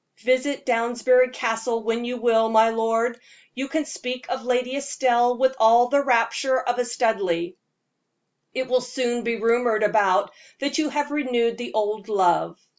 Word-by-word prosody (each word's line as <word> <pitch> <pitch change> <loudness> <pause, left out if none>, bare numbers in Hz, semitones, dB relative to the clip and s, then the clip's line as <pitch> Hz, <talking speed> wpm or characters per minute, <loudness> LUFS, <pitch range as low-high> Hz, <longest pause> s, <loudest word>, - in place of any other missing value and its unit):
Visit 255 +3 0
Downsbury 245 +1 +2
Castle 230 -1 -2
when 230 +1 -2
you 250 +1 -4
will, 225 -1 +2
my 225 0 +4
lord; 225 +1 -1 0.3
you 265 +2 -4
can 310 +2 -2
speak 255 -4 -6
of 260 +1 -3
Lady 250 +1 -1
Estelle 245 -3 +1
with 260 +1 +2
all 230 +2 +5
the 285 +1 +3
rapture 255 +1 +1
of 245 0 -2
a 245 - 0
Studleigh. 200 -8 -1 1.0
It 260 0 -3
will 255 0 +1
soon 245 -1 -3
be 235 0 -1
rumored 230 0 +1
about 205 -3 +2 0.3
that 280 +2 -2
you 310 -1 0
have 290 +1 -2
renewed 240 -5 -1
the 245 - -7
old 210 0 -2
love. 175 - +1
240 Hz, 160 wpm, -23 LUFS, 225-255 Hz, 1.0 s, all